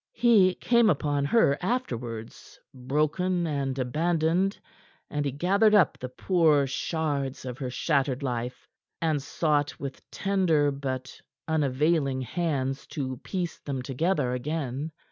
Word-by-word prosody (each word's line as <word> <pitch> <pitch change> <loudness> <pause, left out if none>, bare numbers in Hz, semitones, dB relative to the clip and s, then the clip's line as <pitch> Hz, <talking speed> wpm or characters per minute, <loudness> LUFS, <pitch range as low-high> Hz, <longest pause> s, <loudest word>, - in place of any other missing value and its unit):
He 205 -6 +5
came 235 -2 +3
upon 145 -3 +1
her 140 -5 +3
afterwards, 120 - -4
broken 155 +7 0
and 140 -4 -2
abandoned, 165 +8 +1 0.5
and 145 -1 -1
he 140 - 0
gathered 200 - +3
up 185 -8 +4
the 130 - -5
poor 155 0 +3
shards 140 -1 -2
of 125 -1 -6
her 130 -3 -3
shattered 135 0 0
life, 125 -1 -4 0.3
and 155 -3 0
sought 145 0 0
with 140 -1 -6
tender 170 -7 +2
but 130 -2 -5 0.3
unavailing 145 -2 +1
hands 135 -2 -2
to 130 -3 -4
piece 175 +4 -4
them 135 -3 -4
together 140 0 0
again. 140 +2 -3
145 Hz, 125 wpm, -27 LUFS, 130-170 Hz, 0.5 s, He